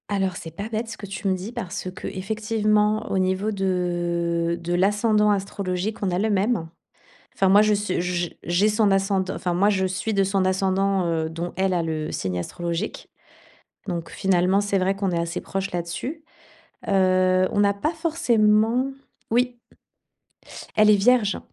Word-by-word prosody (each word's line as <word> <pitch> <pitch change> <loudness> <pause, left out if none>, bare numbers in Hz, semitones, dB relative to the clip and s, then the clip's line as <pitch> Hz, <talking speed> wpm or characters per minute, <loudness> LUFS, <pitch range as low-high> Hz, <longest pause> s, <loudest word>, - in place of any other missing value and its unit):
Alors 195 -3 0
c'est 165 - -8
pas 200 +6 -6
bête 225 +1 -3
ce 225 - -7
que - - -8
tu 195 +1 -5
me 190 - +2
dis 190 +5 -6
parce 190 -6 -5
que, 185 - -7
effectivement, 215 +1 0
au - - +1
niveau 190 +3 0
de 175 -3 -1
de 175 +1 -3
l'ascendant 210 +3 +3
astrologique, 195 +1 -2
on 190 - 0
a 175 - 0
le 220 +2 +1
même. 200 -3 +1 0.7
Enfin 195 - +2
moi, 200 +2 +7
je 215 0 +3
su 205 -3 -1
j 175 -1 -2
j'ai 175 +5 +2
son 210 -1 +2
ascend 195 0 +2
enfin, 180 -2 -2
moi 195 +4 +3
je 190 -2 +1
suis 190 +4 -2
de 195 -1 +3
son 195 0 +1
ascendant, 190 0 +1
heu, 160 -1 0
dont 170 +2 -5
elle 190 0 +1
a 175 - +1
le 155 -1 -3
signe 90 -1 -2
astrologique, 170 - -4 0.8
donc 170 -3 -4
finalement, 190 0 +2
c'est 200 -1 0
vrai 190 +1 +1
qu'on 195 -1 -1
est 170 - 0
assez 170 +1 -3
proche 195 0 -4
là-dessus. 175 - -4 0.6
Heu, 185 -1 +3
on - - 0
n'a 200 0 +4
pas 300 +12 -2
forcément 245 -7 +2 0.4
oui. 245 +1 +1 1.2
Elle 215 0 +5
est 210 - +7
vierge. 215 0 +3
195 Hz, 175 wpm, -24 LUFS, 180-210 Hz, 1.2 s, moi